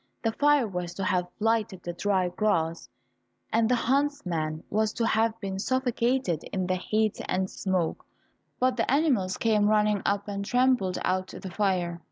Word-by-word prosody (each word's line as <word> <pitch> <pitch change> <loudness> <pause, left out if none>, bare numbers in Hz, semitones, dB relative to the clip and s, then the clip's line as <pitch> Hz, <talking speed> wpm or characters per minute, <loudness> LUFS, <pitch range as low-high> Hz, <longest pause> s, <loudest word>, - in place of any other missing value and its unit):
The 225 - +2
fire 290 0 +3
was 180 -3 -5
to 195 - -3
have 180 -1 +1
lighted 215 -4 0
the 175 - -4
dry 185 0 +1
grass, 170 -4 -1 0.6
and 225 0 +3
the 250 - +4
huntsman 230 - -1
was 215 +1 0
to 230 - -1
have 225 0 +1
been 195 -2 -4
suffocated 245 - 0
in 190 -2 -1
the 185 - 0
heat 215 +3 0
and 185 +1 0
smoke, 185 -4 -2 0.6
but 255 0 +2
the 230 - 0
animals 260 - +2
came 215 -2 +2
running 210 -1 +2
up 200 0 0
and 200 -1 -3
trampled 245 -5 +2
out 185 0 0
the 190 - -8
fire. 180 -3 0
205 Hz, 165 wpm, -27 LUFS, 185-230 Hz, 0.6 s, the